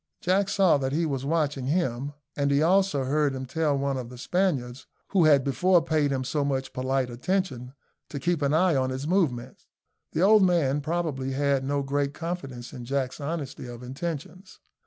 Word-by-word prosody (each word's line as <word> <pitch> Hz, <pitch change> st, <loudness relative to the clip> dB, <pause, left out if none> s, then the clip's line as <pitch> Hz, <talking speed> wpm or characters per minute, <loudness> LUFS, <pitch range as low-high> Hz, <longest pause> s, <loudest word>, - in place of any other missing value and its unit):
Jack 190 Hz, +2 st, +1 dB
saw 190 Hz, -7 st, +4 dB
that 135 Hz, 0 st, -2 dB
he 165 Hz, +3 st, +1 dB
was 135 Hz, -3 st, -2 dB
watching 145 Hz, -4 st, 0 dB
him, 140 Hz, -4 st, -1 dB, 0.2 s
and 140 Hz, -1 st, 0 dB
he 140 Hz, +2 st, +3 dB
also 190 Hz, -4 st, +3 dB
heard 140 Hz, +1 st, +1 dB
him 130 Hz, 0 st, -5 dB
tell 150 Hz, +1 st, 0 dB
one 140 Hz, -1 st, -1 dB
of 125 Hz, -2 st, -5 dB
the 125 Hz, -, -11 dB
Spaniards, 135 Hz, -6 st, -1 dB, 0.2 s
who 185 Hz, -5 st, +3 dB
had 145 Hz, -3 st, +5 dB
before 175 Hz, +7 st, +3 dB
paid 155 Hz, -3 st, +1 dB
him 135 Hz, -2 st, -1 dB
so 145 Hz, +3 st, -1 dB
much 135 Hz, -1 st, -2 dB
polite 130 Hz, 0 st, -1 dB
attention, 130 Hz, -2 st, -2 dB, 0.3 s
to 140 Hz, -, -5 dB
keep 170 Hz, +2 st, 0 dB
an 140 Hz, -1 st, +1 dB
eye 165 Hz, +1 st, +3 dB
on 130 Hz, -1 st, +1 dB
his 130 Hz, +2 st, -4 dB
movements. 135 Hz, -9 st, -1 dB, 0.5 s
The 160 Hz, -, 0 dB
old 215 Hz, +2 st, +6 dB
man, 160 Hz, -7 st, +2 dB
probably, 150 Hz, -4 st, -2 dB
had 140 Hz, -1 st, +1 dB
no 140 Hz, +1 st, -1 dB
great 140 Hz, +1 st, -1 dB
confidence 135 Hz, -8 st, -6 dB
in 125 Hz, -3 st, -7 dB
Jack's 135 Hz, +2 st, -2 dB
honesty 145 Hz, -4 st, -4 dB
of 120 Hz, 0 st, -9 dB
intentions. 165 Hz, +7 st, -6 dB
140 Hz, 185 wpm, -26 LUFS, 130-170 Hz, 0.5 s, old